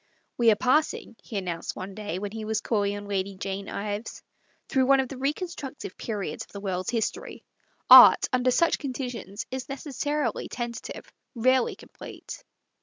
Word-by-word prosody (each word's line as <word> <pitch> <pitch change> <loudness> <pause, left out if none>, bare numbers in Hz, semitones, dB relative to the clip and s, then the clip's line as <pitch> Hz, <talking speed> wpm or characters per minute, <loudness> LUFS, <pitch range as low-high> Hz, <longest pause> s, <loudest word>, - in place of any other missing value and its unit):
" - - -47
We 235 -1 +6
are 215 - +6
passing," 260 +1 +1
he 215 - -6
announced 175 -4 -4
one 190 +1 -7
day, 205 -3 -4
when 200 +1 -4
he 220 0 -6
was 220 0 -1
calling 205 -3 0
on 205 - -8
Lady 195 -1 -2
Jane 195 +1 -4
Ives, 205 +2 -5 0.2
" - - -40
through 260 -2 +2
one 275 0 +5
of 260 -2 0
the 270 - -7
reconstructive 290 -1 -4
periods 200 -8 -4
of - - -19
the 200 - -7
world's 185 -2 -3
his 225 -2 +1
tory. - - -10 0.4
Art, - - +10
under 255 0 +3
such 335 +7 +2
conditions, 250 -7 -5
is 260 0 -4
neces 275 -1 -5
sarily 290 -5 -1
tentative, 235 -1 -6 0.3
rarely 255 +2 +2
complete." - - -11
230 Hz, 180 wpm, -26 LUFS, 200-260 Hz, 0.4 s, Art